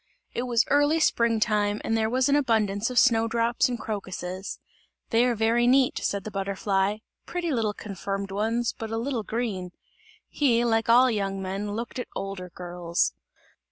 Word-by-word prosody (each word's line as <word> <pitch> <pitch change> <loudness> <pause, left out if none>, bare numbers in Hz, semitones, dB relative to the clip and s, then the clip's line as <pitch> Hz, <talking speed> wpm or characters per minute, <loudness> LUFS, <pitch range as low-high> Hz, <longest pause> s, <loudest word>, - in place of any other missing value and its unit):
It 245 +1 -2
was 235 -1 +3
early 290 +3 +3
spring 235 -7 +2
time, 210 -1 +1
and 225 - 0
there 220 -1 +1
was 255 +3 +2
an 285 - +3
abundance 220 -6 +1
of 250 - -5
snow 230 -3 +5
drops 235 +2 +1
and 240 -2 -3
crocuses. 190 -3 -5 0.5
"They 230 +2 +4
are 245 -1 +1
very 230 +2 +2
neat," 260 0 +3
said 200 -1 -2
the 215 - -6
butterfly, 195 +1 0 0.3
"pretty 345 -2 -2
little 220 -5 0
confirmed 195 0 -5
ones, 225 +4 0
but 225 - -6
a 225 - -2
little 240 0 -2
green!" 210 -5 -3 0.6
He, 240 -5 +2
like 225 -1 +1
all 250 +2 +6
young 195 -3 -2
men 195 +2 -3
looked 235 +4 -5
at 250 - -4
older 195 -2 -5
girls. 175 - -2
225 Hz, 170 wpm, -26 LUFS, 195-240 Hz, 0.6 s, all